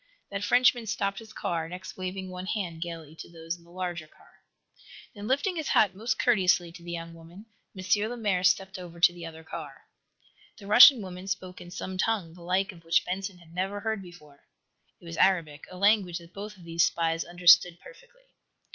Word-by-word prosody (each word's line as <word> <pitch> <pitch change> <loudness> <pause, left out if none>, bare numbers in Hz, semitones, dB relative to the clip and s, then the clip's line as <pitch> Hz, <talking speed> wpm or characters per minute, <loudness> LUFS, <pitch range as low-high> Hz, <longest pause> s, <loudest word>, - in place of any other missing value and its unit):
That 200 0 -3
Frenchman 245 +1 +3
stopped 200 -2 -2
his 220 -1 -13
car, 165 -1 -3
next 180 +1 -8
waving 185 0 -5
one 180 +1 -7
hand 180 -6 -3
gayly 165 -3 -7
to - - -10
those 165 0 -5
in 170 - -19
the 170 - -21
larger 175 -2 -5
car. - - -24 0.7
Then, 205 -2 -8
lifting 285 +8 0
his 315 - -3
hat 200 -3 +3
most 220 +6 -2
courteously 185 -7 +2
to 170 +1 -13
the 175 - -7
young 165 0 -6
woman, 165 +5 -14 0.3
M. 185 - -6 0.3
Lemaire 210 -7 -1
stepped 190 +1 +1
over 170 -1 -10
to 175 +1 +6
the 170 -1 -8
other 160 0 -11
car. 150 -4 -9 0.7
The 200 - -13
Russian 235 +3 +8
woman 185 0 -8
spoke 185 -2 -5
in 175 - -10
some 185 +1 -6
tongue, 200 -7 0
the 175 - -15
like 185 +3 0
of 170 -3 -16
which 170 +2 +2
Benson 190 +1 -4
had 170 -1 -18
never 195 +3 -3
heard 220 -2 -2
before. 150 -6 -15 0.5
It - - -18
was 165 0 -7
Arabic, 165 -6 +1
a 185 - -10
language 200 -3 +3
that 170 0 -14
both 205 +1 -8
of 180 - -15
these 170 0 +1
spies 165 0 0
understood 175 0 +5
perfectly. - - -17
180 Hz, 200 wpm, -28 LUFS, 170-200 Hz, 0.7 s, Russian